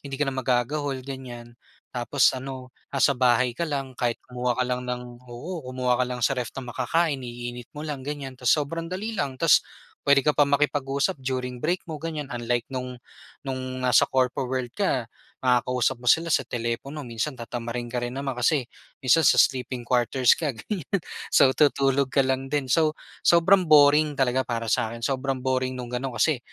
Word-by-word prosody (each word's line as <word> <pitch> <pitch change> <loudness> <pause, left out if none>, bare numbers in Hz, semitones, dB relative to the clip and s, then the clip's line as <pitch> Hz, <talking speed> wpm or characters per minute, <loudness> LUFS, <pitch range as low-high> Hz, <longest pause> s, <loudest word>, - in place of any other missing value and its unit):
hindi 135 -1 -6
ka 145 - +1
na 135 - -2
magagahol, 130 +1 -1
ganiyan. 125 -3 -8 0.4
Tapos 125 +3 +2
ano, 130 -1 -7 0.2
nasa 140 0 +3
bahay 125 -1 +3
ka 165 +7 -3
lang, 135 -3 -3
kahit 120 -1 +1
kumuha 125 -1 -2
ka 125 - +1
lang 125 0 -2
ng, 125 0 -5
oo, 160 +9 -6
kumuha 125 -1 0
ka - - +4
lang 125 -2 -2
sa 135 - +3
ref 125 -3 -2
ng 125 -3 -6
makakain, 145 +2 0
iinit 120 0 -7
mo 150 - -5
lang, 145 -3 -4
ganiyan, 140 -1 -5
tapos 125 +2 +2
sobrang 165 +3 -3
dali 205 +5 -4
lang. 140 -10 -2
Tapos, - - +5 0.4
puwede 140 0 +5
ka 150 - +3
pa 145 - +4
makipag-usap 140 -1 +1
during 125 -1 -3
break 175 +4 0
mo, 160 - -5
ganiyan, 155 -3 -4
unlike 120 0 -1
no'ng, 125 -1 -4 0.5
no'ng 130 -1 -4
nasa 125 -3 +5
corpo 130 0 +1
world 125 -2 -3
ka 135 - 0 0.4
makakausap 125 0 +1
mo 125 - -12
sila 165 +6 +4
sa 135 -4 +2
telepono, 120 +6 -4
minsan 120 +3 -3
tatamarin 120 0 -5
ka 125 - -2
rin 120 +1 -3
naman, 135 0 -3
kasi 135 +3 +2 0.4
minsan 135 +4 +4
sa - - +6
sleeping 130 -2 +2
quarters 125 0 +3
ka 155 -4 0
ganiyan, 190 - -3 0.4
so, 130 - +7
tutulog 140 -2 +3
ka 135 - +3
lang 130 0 -1
din. 135 -2 -2
So, 155 0 +3 0.3
sobrang 175 +2 +5
boring 150 0 +6
talaga 130 -1 +1
para 115 -2 -2
sa'kin, 115 +1 -1
sobrang 135 +1 -1
boring 130 0 0
no'ng 125 0 -4
gano'n 135 -1 -5
kasi, 145 +2 +2
130 Hz, 185 wpm, -25 LUFS, 125-145 Hz, 0.5 s, so